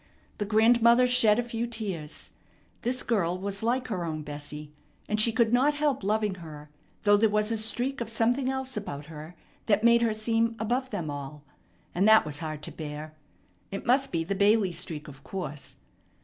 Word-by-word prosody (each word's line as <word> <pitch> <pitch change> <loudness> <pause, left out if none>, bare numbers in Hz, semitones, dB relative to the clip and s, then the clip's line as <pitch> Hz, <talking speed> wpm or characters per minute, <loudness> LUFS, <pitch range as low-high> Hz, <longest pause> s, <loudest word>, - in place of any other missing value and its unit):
The 205 - -1
grandmother 235 +3 +5
shed 225 -4 +5
a 245 - +1
few 235 0 -3
tears. 195 -10 -5 0.5
This 250 +2 -2
girl 180 -7 0
was 200 +1 -4
like 250 +3 -1
her 185 -6 -2
own 155 -2 -4
Bessie, 150 0 -6 0.4
and 215 0 +2
she 230 - +5
could 230 0 +2
not 280 +4 +3
help 295 -6 0
loving 210 0 0
her, 150 -2 -11 0.3
though 205 -1 +5
there 220 +1 +3
was 210 +1 +1
a 225 - +1
streak 240 +5 0
of 230 - -3
something 240 +4 +1
else 265 0 -4
about 150 -9 -5
her 155 +2 -10 0.3
that 210 0 +2
made 235 0 +5
her 225 -2 +1
seem 225 +1 0
above 245 +4 -1
them 170 -9 -4
all; 145 +1 -7 0.5
and 190 +4 +2
that 220 0 +7
was 150 -1 -4
hard 155 -2 -6
to - - -7
bear. 155 0 -7 0.6
It 195 - -6
must 270 +3 +2
be 165 -1 -1
the 190 +5 -2
Bailey 200 0 +3
streak, 165 -3 -6
of 135 -2 -13
course. 150 -7 -7
210 Hz, 190 wpm, -27 LUFS, 160-235 Hz, 0.6 s, that